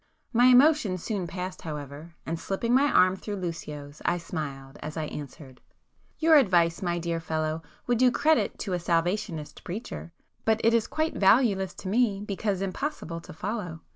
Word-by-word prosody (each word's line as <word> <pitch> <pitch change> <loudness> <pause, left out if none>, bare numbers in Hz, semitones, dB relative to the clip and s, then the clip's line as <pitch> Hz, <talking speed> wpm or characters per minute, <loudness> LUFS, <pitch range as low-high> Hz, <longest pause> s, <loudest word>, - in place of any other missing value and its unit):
My 240 +1 +5
emotion 255 -6 +5
soon 190 0 -3
passed 180 +2 -5
however, 150 +1 -7
and 165 +1 -3
slipping 230 +7 -1
my 280 +3 +4
arm 185 +1 +5
through 205 +2 -5
Lucio's, 155 -5 -6
I 175 - +1
smiled, 140 -6 -6
as 150 +2 -6
I 155 - -1
answered— 140 -3 -9 0.6
"Your 320 -1 +6
advice, 175 - +3
my 175 -2 0
dear 170 -1 -2
fellow, 160 -1 -2 0.2
would 240 -2 +1
do 255 0 +6
credit 310 +5 +2
to 195 - -3
a 180 - 0
Salvationist 170 -2 -1
preacher,—but 215 +2 -4
it 230 - +4
is 230 -2 +2
quite 315 +1 -1
valueless 195 -3 +3
to - - -8
me, 210 -1 +2
because 200 -1 -2
impossible 190 - -4
to - - -11
follow. 180 -2 -4
185 Hz, 165 wpm, -27 LUFS, 165-220 Hz, 0.6 s, Your